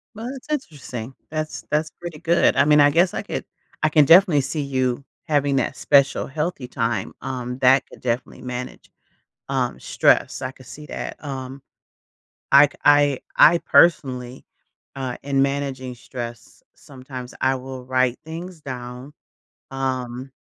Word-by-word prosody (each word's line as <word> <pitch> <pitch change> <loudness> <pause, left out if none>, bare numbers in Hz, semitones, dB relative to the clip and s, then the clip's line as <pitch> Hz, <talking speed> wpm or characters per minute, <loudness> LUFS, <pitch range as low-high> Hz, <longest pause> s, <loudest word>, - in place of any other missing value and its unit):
Well, 230 +3 -6
that's 270 0 -10
interesting. 135 - -5 0.2
That's 155 0 -4
that's 155 +1 0
pretty 170 -3 -7
good. 170 0 +3
I - - +5
mean, 150 0 +5
I 145 0 +7
guess 175 +4 +3
I - - -2
could 205 - -5 0.4
I 155 - +4
can 150 -1 +5
definitely 170 -1 +6
see 140 +3 -3
you 130 -1 -1 0.2
having 145 -2 +1
that 130 - -1
special 140 -1 +3
healthy 150 -2 -3
time, 115 -2 -2
um, 125 -1 -4
that 130 +1 +5
could - - -15
definitely 125 +1 -3
manage, 125 0 -7 0.6
um, 130 -3 -1
stress. - - +2
I 130 - -3
could 130 -2 -17
see 150 0 -10
that. - - -6
Um, 135 -1 -6 0.9
I 140 +1 +9
ca - - -19
I 145 -2 +5 0.2
I 170 +2 +7
personally, 130 -8 +2 0.5
uh, 130 -2 -4
in 135 -1 +2
managing 135 -2 -2
stress, 120 -2 -8
sometimes 130 -2 -10
I 130 0 +2
will 130 0 -8
write 130 -1 +1
things 165 +1 -8
down, 125 +1 -8 0.6
um, 130 -1 -3
135 Hz, 150 wpm, -22 LUFS, 125-150 Hz, 0.9 s, I